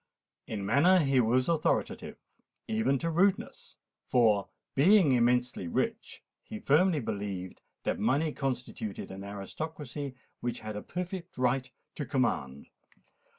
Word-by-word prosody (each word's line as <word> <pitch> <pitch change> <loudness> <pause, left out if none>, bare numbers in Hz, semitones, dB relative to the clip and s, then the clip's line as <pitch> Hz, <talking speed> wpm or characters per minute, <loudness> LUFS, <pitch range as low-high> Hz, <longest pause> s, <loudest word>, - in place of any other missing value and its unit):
In 100 -3 -4
manner 145 - +5
he 135 -6 +3
was 125 +2 +3
authoritative, 165 -2 0 0.5
even 220 - +1
to 165 +4 -2
rudeness: 185 +4 0 0.3
for, 110 -5 +3 0.2
being 175 +2 +5
immensely 125 -5 +2
rich, 220 - -2 0.2
he 220 - -8
firmly 170 -1 +3
believed 100 -5 -4 0.2
that - - -1
money 150 +3 +1
constituted 125 -8 -4
an 95 +1 -7
aristocracy 140 +7 -6 0.2
which 120 -1 -3
had 110 -1 -6
a 105 - -4
perfect 180 - -6
right 125 +1 +1 0.2
to 145 - -5
command. 70 - -1
130 Hz, 120 wpm, -30 LUFS, 110-160 Hz, 0.5 s, manner